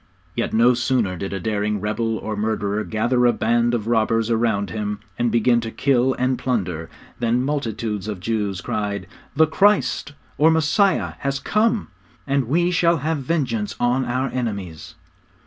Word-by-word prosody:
Yet - - -1
no 120 +3 +5
sooner 120 -5 0
did 95 +3 -5
a 100 - -3
daring 105 +1 -1
rebel 110 +2 -1
or 110 0 -4
murderer 105 -1 -1
gather 120 +3 +1
a 120 - +4
band 120 +1 +1
of 110 -3 -3
robbers 115 0 +1
around 110 -4 +1
him, 105 +1 -3 0.2
and 120 -1 +1
begin 120 +1 +3
to 115 - -4
kill 130 +1 +2
and 130 0 0
plunder, 90 -10 -2 0.3
than 120 +1 +1
multitudes 115 -7 -2
of 105 -4 -4
Jews 100 -2 -2
cried, 100 -2 -3 0.3
'The 160 +2 +6
Christ, 195 -2 +2 0.3
or 155 +2 +6
Messiah 160 +5 +2
has 140 -1 -1
come; 215 - +1 0.4
now 140 0 +1
we 165 +8 +1
shall 170 -1 +3
have 155 +2 -1
vengeance 125 -8 -1
on 125 +2 +2
our 130 +2 -1
enemies!' 100 -11 -5
115 Hz, 160 wpm, -22 LUFS, 105-135 Hz, 0.4 s, The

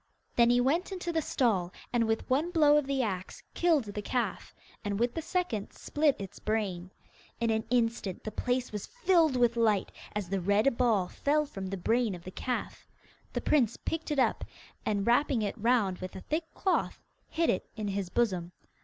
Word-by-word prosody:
Then 235 -1 +5
he 245 0 +4
went 310 +10 +1
into 360 -2 -3
the 325 - +2
stall, 205 - +1 0.2
and 235 -2 +2
with 225 0 -1
one 285 +6 +1
blow 305 -4 +5
of 295 -2 +2
the 275 -2 +1
axe 190 -4 -4
killed 330 -6 +3
the 205 -1 -5
calf, 225 -3 -2 0.3
and 205 -1 -2
with 240 +1 +1
the 325 - -3
second 325 - -2
split 295 -2 +1
its 195 -2 -8
brain. 195 -5 -2 0.5
In 230 0 +1
an 220 0 0
instant 230 -6 0
the 215 - -4
place 250 +2 -1
was 210 -2 -5
filled 360 - +3
with 240 -1 +3
light, 220 -4 +2 0.2
as 205 -4 -2
the 195 -1 -1
red 205 +7 +3
ball 225 -7 +2
fell 300 +9 +1
from 195 -9 -6
the 195 +1 -3
brain 225 +2 +1
of 170 - -11
the 185 - -8
calf. 250 +5 -4 0.5
The - - -1
prince 260 -8 +2
picked 325 0 -4
it 295 - -1
up, 260 - +2 0.4
and, 205 -2 +1
wrapping 245 -1 +3
it 205 - -2
round 225 -5 +2
with 185 0 -7
a 190 - -6
thick 320 - -3
cloth, 380 - 0 0.3
hid 330 0 +2
it - - -3
in 215 -2 -3
his 195 -2 -2
bosom. 180 -5 0
235 Hz, 195 wpm, -30 LUFS, 200-285 Hz, 0.5 s, Then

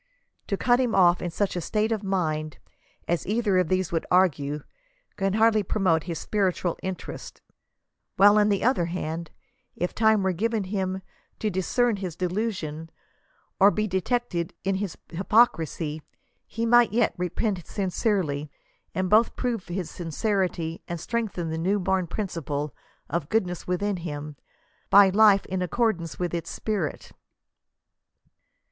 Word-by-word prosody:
To 200 - -1
cut 245 +3 +3
him 245 -3 +1
off 175 -2 +5
in 175 - -2
such 195 +3 -1
a 175 - -2
state 215 +6 0
of 220 -2 0
mind 155 -6 -1 0.5
as 175 -2 -1
either 210 -3 +2
of 180 - +1
these 185 0 0
would 165 -1 -1
argue, 150 -5 +2 0.5
can 195 -1 0
hardly 220 0 +4
promote 185 -5 +1
*• - - -15
his 170 -2 -4
spiritual 185 -4 0
interests 190 -1 -6 0.4
;" - - -56
while, 205 +2 +7
on 210 0 +4
the 200 -2 +1
otherhand, 170 -7 -1 0.5
if 180 - -2
time 220 -2 +3
were 190 - +2
given 220 +3 0
him 190 -1 -3 0.3
to 215 - -1
discern 215 +5 +1
his 185 -4 -5
delusion, 180 -4 -3 0.7
or 200 +1 +8
be 215 +1 0
detected 190 -2 -1
in 195 - +1
his 195 -3 -4
hypoc 210 +7 +4
risy, 155 -1 -5 0.5
he 230 +2 -3
might 240 0 +5
yet 230 0 +2
repent 180 +1 -2
sincerely, 185 -7 -1 0.5
and 185 0 0
both 215 +5 +4
prove 235 -6 -2
his 175 -1 -4
sincerity 175 -1 -2
and 170 -1 -4
strengthen 200 -6 -3
the 160 - -3
new 190 +5 +1
born 190 -1 0
principle 150 - -3 0.3
of 165 -4 -3
goodness 180 -6 -1
within 190 +2 0
him, 150 -3 -6 0.5
by 200 0 +8
a 190 - +2
life 205 -1 +5
in 185 0 -3
accordance 180 -3 -1
with 175 -2 -2
its 170 -1 -3
spirit. 200 -8 -3
185 Hz, 150 wpm, -26 LUFS, 170-210 Hz, 0.7 s, or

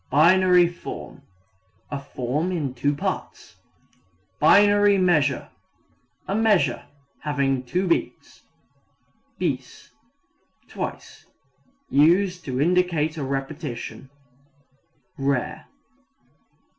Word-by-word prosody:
Binary 180 +4 +5
form 175 +1 -9 0.7
a 140 -1 -4
form 140 +6 -3
in 150 -8 -2
two 145 +3 0
parts. - - -5 0.8
Binary 205 +4 +5
measure 150 -8 +1 0.8
a 195 - -2
measure 200 - +2 0.4
having 140 -3 -1
two 180 +9 -1
beats. 170 - -2 1.0
Bis - - -4 0.8
twice. - - -7 0.6
Used 180 +5 +3
to 130 -2 -3
indicate 165 -1 +1
a 155 - -4
repetition. 135 -2 -5 1.1
(Rare.) 135 -2 -2
155 Hz, 80 wpm, -23 LUFS, 140-180 Hz, 1.1 s, Binary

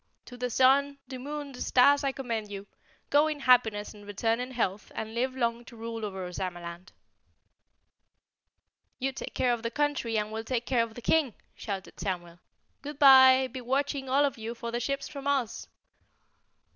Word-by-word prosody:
"To 245 - -11
the 250 0 -3
sun 275 +4 +3
the 260 -2 -7
moon 290 +1 -6
the 250 - -10
stars 280 +3 +4
I 275 - +1
commend 230 -6 -4
you! 200 -1 -7 0.5
Go 295 +2 +5
in 300 -2 -3
happiness 225 -5 +3
and 205 -1 -14
return 225 +3 -1
in 250 +1 -4
health 210 -5 -2
and 220 0 -5
live 255 +3 -1
long 235 -2 -1
to 245 - -13
rule 230 0 -6
over 190 -3 -4
Ozamaland." 175 0 -6 2.1
"You 270 +1 -1
take 265 - -8
care 250 -1 +2
of 235 - -3
the 230 - -2
country 275 -4 -1
and 210 0 -2
we'll 220 0 -4
take 240 0 -2
care 250 -3 +2
of 230 -1 -4
the 240 - -9
King," 290 -7 +2 0.2
shouted 195 -3 -6
Samuel. 175 -3 -4 0.4
"Goodbye! 270 -3 +7
Goodbye! - - -2
Be 260 - -5
watching, 270 +2 -1
all 280 +3 +4
of 275 -4 -3
you, 225 +2 -5
for 235 0 -6
the 240 - -1
ships 275 +3 -2
from 280 -1 -7
Oz!" 265 -5 -1
245 Hz, 185 wpm, -28 LUFS, 220-270 Hz, 2.1 s, Goodbye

